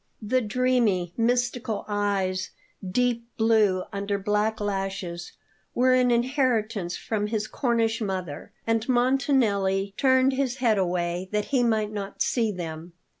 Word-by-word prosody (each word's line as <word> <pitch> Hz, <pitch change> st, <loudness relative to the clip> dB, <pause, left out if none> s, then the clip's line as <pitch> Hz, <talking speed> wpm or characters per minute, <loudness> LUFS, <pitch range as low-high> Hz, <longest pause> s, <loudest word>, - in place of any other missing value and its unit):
The 245 Hz, +4 st, 0 dB
dreamy, 220 Hz, -6 st, +1 dB
mystical 245 Hz, -1 st, 0 dB
eyes, 200 Hz, -3 st, -1 dB, 0.3 s
deep 235 Hz, +4 st, 0 dB
blue 215 Hz, -5 st, +3 dB
under 200 Hz, 0 st, -2 dB
black 210 Hz, +2 st, 0 dB
lashes, 195 Hz, -4 st, -4 dB, 0.4 s
were 255 Hz, +1 st, +4 dB
an 250 Hz, -1 st, +4 dB
inheritance 235 Hz, -7 st, 0 dB
from 210 Hz, -2 st, -2 dB
his 215 Hz, -1 st, -2 dB
Cornish 230 Hz, -1 st, 0 dB
mother, 185 Hz, -7 st, -4 dB
and 225 Hz, +1 st, 0 dB
Montanelli 235 Hz, -7 st, +2 dB
turned 260 Hz, 0 st, +4 dB
his 260 Hz, -2 st, -1 dB
head 235 Hz, -6 st, +2 dB
away, 175 Hz, 0 st, -1 dB
that 210 Hz, -1 st, 0 dB
he 260 Hz, -, +4 dB
might 220 Hz, -3 st, +1 dB
not 200 Hz, -2 st, -3 dB
see 230 Hz, -4 st, +1 dB
them. 170 Hz, -2 st, -7 dB
215 Hz, 125 wpm, -26 LUFS, 195-245 Hz, 0.4 s, were